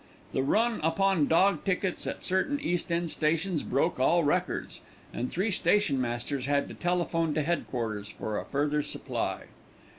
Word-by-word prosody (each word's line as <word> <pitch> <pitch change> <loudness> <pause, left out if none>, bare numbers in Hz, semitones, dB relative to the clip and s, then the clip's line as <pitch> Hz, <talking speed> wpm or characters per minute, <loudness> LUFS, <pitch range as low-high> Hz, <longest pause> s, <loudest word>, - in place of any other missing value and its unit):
The - - +1
run 225 - +2
upon 165 0 +2
dog 190 +5 +3
tickets 190 -1 -1
at - - -4
certain 190 +11 +1
East 175 -9 -2
end 170 -1 0
stations 165 +2 +1
broke 140 +3 0
all 170 +6 +4
records, 145 - -1 0.3
and 125 - -2
three 195 +5 -1
stationmasters 135 -9 +1
had 140 0 +1
to - - -7
telephone 165 -3 0
to 155 - +1
headquarters 115 -10 -2
for 110 -1 -4
a - - -7
further 150 +1 0
supply. - - -4
165 Hz, 150 wpm, -29 LUFS, 140-180 Hz, 0.3 s, all